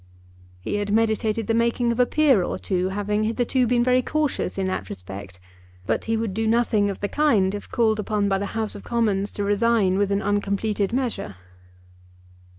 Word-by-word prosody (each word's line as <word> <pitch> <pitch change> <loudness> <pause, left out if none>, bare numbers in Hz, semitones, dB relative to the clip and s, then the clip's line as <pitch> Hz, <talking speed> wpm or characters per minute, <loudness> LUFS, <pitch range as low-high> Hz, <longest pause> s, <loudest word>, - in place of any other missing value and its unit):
He 205 - -2
had 205 0 -2
meditated 220 0 +1
the 225 - 0
making 235 +1 +1
of 235 - -3
a 250 - +4
peer 290 -9 +3
or - - -2
two, 185 -1 -1
having 205 +2 -1
hitherto 245 +3 +1
been 240 0 +2
very 255 +1 +3
cautious 295 -8 -1
in 190 - 0
that 145 - -3
respect, 95 0 -9 0.5
but - - -1
he 225 0 0
would 220 -3 -2
do 220 +2 -1
nothing 220 -3 +2
of 195 - -6
the 205 - 0
kind 210 -9 +2
if 205 - -7
called 220 -2 +1
upon 210 -1 0
by 195 -1 +1
the 200 - -3
House 220 -1 -1
of 205 - -9
Commons 210 -4 0
to 205 - -3
resign 205 -2 +2
with 200 -1 +1
an 200 +1 0
uncompleted 205 0 0
measure. 245 - -2
210 Hz, 190 wpm, -23 LUFS, 200-235 Hz, 0.5 s, a